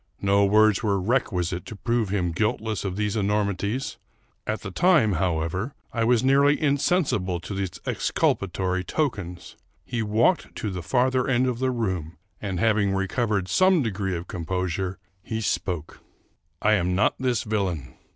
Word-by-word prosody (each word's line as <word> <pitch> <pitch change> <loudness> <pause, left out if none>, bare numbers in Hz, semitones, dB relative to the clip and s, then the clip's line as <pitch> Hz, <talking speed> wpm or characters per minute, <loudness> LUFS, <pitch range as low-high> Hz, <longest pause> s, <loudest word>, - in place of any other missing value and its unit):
No 100 +1 +4
words 105 0 +4
were 100 -4 +1
requisite 90 -5 0
to 110 - -7
prove 115 0 0
him 90 -4 0
guilt 105 +6 0
less 110 -4 -3
of 95 -2 -3
these 105 0 -1
enormities: 105 +3 -1 0.5
at 110 - -2
the 100 - -6
time, 155 - +4
however, 90 - -1 0.2
I 115 -1 +1
was 120 0 +3
nearly 140 +2 +4
insensible 140 - +1
to 100 - -6
these 95 -3 -4
exculpatory 95 -1 0
tokens. 95 - -3 0.3
He 120 -2 -2
walked 110 - +1
to 105 - -3
the 90 -1 -4
farther 130 +6 +1
end 130 -1 +2
of 125 -2 -1
the 130 0 +1
room, 95 -10 -2 0.2
and, 95 -4 -3
having 105 -2 +2
recovered 95 0 0
some 185 - +4
de 115 - -1
gree 95 -1 -2
of 85 +2 -7
composure, 90 +1 -3 0.2
he 110 +3 -4
spoke: 90 -7 -2 0.2
— - - -41
" - - -46
I 110 - +4
am 90 -3 +1
not 105 - +3
this 125 -3 0
villain. 95 - -2
105 Hz, 165 wpm, -25 LUFS, 95-120 Hz, 0.5 s, No